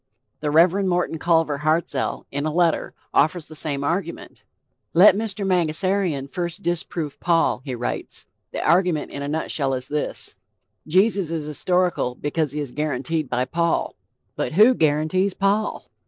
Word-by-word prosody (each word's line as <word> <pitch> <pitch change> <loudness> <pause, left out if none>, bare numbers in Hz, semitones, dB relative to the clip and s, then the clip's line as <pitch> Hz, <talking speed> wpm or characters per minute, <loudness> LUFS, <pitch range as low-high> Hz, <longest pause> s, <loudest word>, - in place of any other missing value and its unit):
The 150 - -2
Rev. 170 +6 +4
Morton 175 -3 -1
Culver 165 -4 +1
Hartzell, 155 -2 -1
in 145 +2 -2
a - - -1
letter, 170 0 0 0.2
offers 155 +2 +2
the 155 - -11
same 145 -2 +3
argument. 170 +3 -4 0.5
"Let 185 +2 +7
Mr. 205 -2 -2
Mangasarian 180 -3 +1
first 175 +6 -4
disprove 165 -3 -3
Paul," 165 -6 +1
he 130 -3 -4
writes. 120 +1 -5 0.3
The - - -3
argument 170 -2 +2
in 140 - -6
a 140 - -4
nutshell 145 -3 -1
is 130 0 -5
this: 150 0 -1 0.5
Jesus 190 +1 +3
is 165 -2 -3
historical 175 -3 0
because 145 +1 -2
he 150 - -3
is 145 -4 -4
guaranteed 150 +1 -2
by 125 +1 0
Paul. 170 +3 -1 0.4
But - - -3
who 215 +9 +6
guarantees 160 +3 +1
Paul? 200 +2 0
160 Hz, 150 wpm, -22 LUFS, 150-180 Hz, 0.5 s, Let